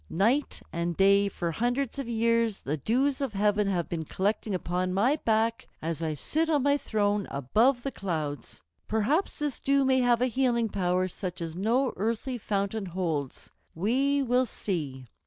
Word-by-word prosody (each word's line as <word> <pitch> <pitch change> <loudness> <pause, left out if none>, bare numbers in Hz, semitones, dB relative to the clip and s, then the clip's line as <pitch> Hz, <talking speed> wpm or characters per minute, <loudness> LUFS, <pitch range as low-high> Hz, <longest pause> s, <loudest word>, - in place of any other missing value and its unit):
Night 235 - +1
and 170 0 -2
day 200 +1 +5
for 170 -3 -3
hundreds 245 - -1
of 260 -4 -4
years 230 -2 +1
the 145 - -2
dews 260 - 0
of 270 -5 -2
heaven 205 0 +2
have 180 -4 0
been 165 -2 -3
collecting 200 +4 -1
upon 180 +1 -1
my 250 +10 +3
back 225 +1 +1
as 165 0 -3
I 160 -2 -1
sit 315 - -1
on 295 -4 +2
my 285 0 +4
throne 205 -6 0
above 225 - +2
the 275 - -2
clouds. 155 - -4 0.2
Perhaps 240 - 0
this 295 -3 -2
dew 275 0 +2
may 260 0 +3
have 245 -2 +3
a 250 - +3
healing 245 -2 +1
power 185 -1 0
such 185 0 -5
as 165 -1 -5
no 235 +8 +1
earthly 230 +5 -2
fountain 200 0 -2
holds. 165 -7 -3 0.2
We 270 - +1
will 250 0 +2
see." 145 - -4
210 Hz, 170 wpm, -28 LUFS, 180-250 Hz, 0.2 s, day